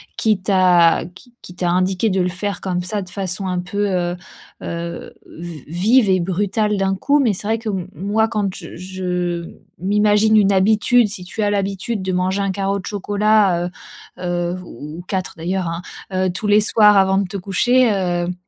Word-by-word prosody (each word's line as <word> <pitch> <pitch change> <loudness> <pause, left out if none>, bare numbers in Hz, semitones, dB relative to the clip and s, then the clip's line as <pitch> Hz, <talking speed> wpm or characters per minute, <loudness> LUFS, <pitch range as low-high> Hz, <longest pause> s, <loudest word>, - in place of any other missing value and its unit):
qui 215 -3 +1
t'a 180 -4 +4
qui 185 +8 -15
qui - - -40
qui 180 - -12
t'a 175 -1 0
indiqué 185 +3 +1
de 190 -1 +1
le 180 - +1
faire 195 +1 -4
comme 180 -2 -2
ça 205 +3 -2
de 185 - -9
façon 190 0 -4
un 180 -1 -1
peu, 205 +3 -2
heu, 175 -2 -1 0.5
heu, 170 0 -5
v 165 -4 -9
vive 205 - +3
et 185 - +3
brutale 205 +4 0
d'un 195 0 +1
coup, 280 +9 +2
mais 235 -7 +2
c'est 205 +3 -6
vrai 225 +1 +1
que 225 -1 -5
m 185 -2 -3
moi 210 +4 +1
quand 205 -4 -2
j - - -10
je 180 -1 -3 0.4
je - - -6
m'imagine 210 +1 +3
une 200 -1 +4
habitude, 215 +4 +3
si 195 -3 -7
tu 215 +4 -6
as 205 - +2
l'habitude 200 +2 -2
de 190 - -2
manger 185 +2 0
un 195 - 0
carreau 195 +1 -1
de - - -10
chocolat, 205 -3 +1 0.5
heu, - - -12
heu, 175 0 -1
ou 150 0 -9
ou - - -6
4 190 -2 -3
d'ailleurs 180 +2 -2
hein, 165 +1 -4 0.3
heu, 185 0 +1
tous 195 +4 -6
les 205 +1 +5
soirs 210 -1 +5
avant 190 0 +4
de 200 - +1
te 200 +2 -5
coucher, 240 +7 +2
heu, 175 -3 0
d 180 - -2
190 Hz, 210 wpm, -19 LUFS, 180-205 Hz, 0.5 s, les